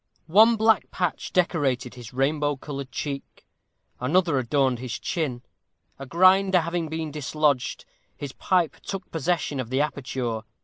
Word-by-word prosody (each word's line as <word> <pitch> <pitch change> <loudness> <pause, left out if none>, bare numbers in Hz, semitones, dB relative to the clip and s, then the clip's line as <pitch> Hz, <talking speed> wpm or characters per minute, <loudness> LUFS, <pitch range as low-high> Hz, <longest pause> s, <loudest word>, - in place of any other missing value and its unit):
One 215 +8 +6
black 220 -1 +3
patch 180 -1 -2
decorated 140 -8 +1
his 120 -3 -10
rainbow 145 +3 +1
colored 140 -1 -7
cheek; 140 -2 -6 0.5
another 155 +3 +2
adorned 130 0 +1
his 125 -3 -4
chin; 140 -9 -3 0.6
a 135 - -7
grinder 185 +3 +5
having 170 0 -2
been 160 -1 -4
dislodged, 150 -2 0 0.3
his 140 -2 -6
pipe 175 +3 0
took 195 -2 -7
possession 160 -3 -1
of 125 -3 -4
the 130 +2 +1
aperture. 130 -6 -2
150 Hz, 135 wpm, -25 LUFS, 130-175 Hz, 0.6 s, One